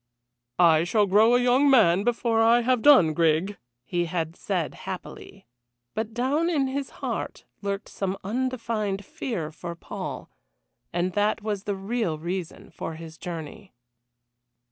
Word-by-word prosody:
"I 165 Hz, -2 st, +5 dB
shall 205 Hz, +4 st, +2 dB
grow 215 Hz, +5 st, +5 dB
a -, -, +4 dB
young 250 Hz, +3 st, +4 dB
man 210 Hz, -10 st, +5 dB
again -, -, -2 dB
before 235 Hz, -1 st, +1 dB
I 230 Hz, +2 st, +5 dB
have 250 Hz, 0 st, +1 dB
done, 240 Hz, -, +6 dB
Grig!" 165 Hz, +5 st, +1 dB, 0.2 s
he 175 Hz, +7 st, -1 dB
had 165 Hz, -1 st, -3 dB
said 180 Hz, -6 st, -2 dB
happily. 190 Hz, +1 st, -9 dB, 0.5 s
But 220 Hz, 0 st, -3 dB
down 270 Hz, +8 st, 0 dB
in 295 Hz, -6 st, +1 dB
his 270 Hz, +1 st, -3 dB, 0.2 s
heart -, -, -4 dB, 0.2 s
lurked 200 Hz, 0 st, -3 dB
some 195 Hz, -1 st, -3 dB
undefined 225 Hz, -3 st, -2 dB
fear 235 Hz, -, -4 dB
for 170 Hz, +2 st, -7 dB
Paul, -, -, -7 dB, 0.6 s
and 175 Hz, +1 st, -1 dB
that 210 Hz, +1 st, +1 dB
was 210 Hz, -2 st, -3 dB
the 205 Hz, -, -1 dB
real 195 Hz, -4 st, -2 dB
reason 175 Hz, +2 st, -5 dB
for 165 Hz, -, -6 dB
his 160 Hz, 0 st, -10 dB
journey. 175 Hz, +1 st, -8 dB
200 Hz, 145 wpm, -26 LUFS, 175-240 Hz, 0.6 s, done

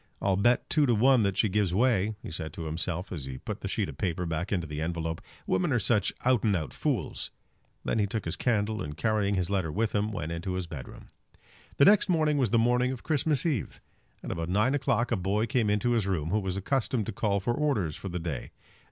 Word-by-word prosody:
"I'll 95 Hz, -1 st, +2 dB
bet 120 Hz, +6 st, +2 dB
two 150 Hz, -3 st, +3 dB
to 120 Hz, -, +3 dB
one 130 Hz, +3 st, +5 dB
that 100 Hz, -2 st, 0 dB
she 110 Hz, -, +4 dB
gives 95 Hz, -2 st, +1 dB
way," 110 Hz, -2 st, +2 dB
he -, -, -7 dB
said 80 Hz, -2 st, -5 dB
to 85 Hz, -, -6 dB
himself, 85 Hz, +3 st, -3 dB
as 75 Hz, -7 st, -4 dB
he 65 Hz, -1 st, -6 dB
put -, -, -6 dB
the -, -, -3 dB
sheet -, -, -1 dB
of -, -, -9 dB
paper 90 Hz, -1 st, -1 dB
back 85 Hz, +3 st, -3 dB
into 90 Hz, -5 st, 0 dB
the 75 Hz, 0 st, -5 dB
envelope. 80 Hz, 0 st, -2 dB, 0.2 s
"Women 175 Hz, -4 st, +1 dB
are 125 Hz, -, +3 dB
such 105 Hz, -1 st, +2 dB
out 125 Hz, -3 st, +3 dB
and 105 Hz, -3 st, +3 dB
out 80 Hz, -5 st, -3 dB
fools." -, -, -2 dB, 0.6 s
Then -, -, 0 dB
he 105 Hz, -, +2 dB
took 110 Hz, +2 st, -3 dB
his 85 Hz, -, -2 dB
candle, 110 Hz, -2 st, 0 dB
and 75 Hz, 0 st, -5 dB
carrying 105 Hz, -3 st, +1 dB
his 90 Hz, 0 st, -1 dB
letter 95 Hz, -6 st, 0 dB
with 110 Hz, +5 st, 0 dB
him, 105 Hz, +1 st, 0 dB
went 85 Hz, -6 st, -4 dB
into 85 Hz, +3 st, -3 dB
his 90 Hz, -1 st, -2 dB
bedroom. 75 Hz, -6 st, -9 dB, 0.7 s
The 140 Hz, -, +6 dB
next 205 Hz, -1 st, +5 dB
morning 155 Hz, -4 st, +2 dB
was 125 Hz, -5 st, +2 dB
the 115 Hz, -, +3 dB
morning 125 Hz, +2 st, +3 dB
of 130 Hz, -, -6 dB
Christmas 150 Hz, -2 st, +1 dB
Eve. 145 Hz, -, -1 dB, 0.4 s
At -, -, -4 dB
about 85 Hz, 0 st, -3 dB
nine 105 Hz, +8 st, +2 dB
o'clock 120 Hz, -4 st, +1 dB
a -, -, +3 dB
boy 100 Hz, +4 st, 0 dB
came 115 Hz, -2 st, +1 dB
into 105 Hz, +4 st, +1 dB
his 115 Hz, -5 st, +1 dB
room 85 Hz, -4 st, -1 dB
who 105 Hz, -, +2 dB
was 95 Hz, -2 st, -3 dB
accustomed 120 Hz, +1 st, 0 dB
to -, -, -3 dB
call 100 Hz, 0 st, 0 dB
for 110 Hz, +5 st, 0 dB
orders 120 Hz, -, 0 dB
for 100 Hz, -, -6 dB
the 90 Hz, -, -3 dB
day. 80 Hz, -7 st, -4 dB
100 Hz, 240 wpm, -28 LUFS, 85-120 Hz, 0.7 s, The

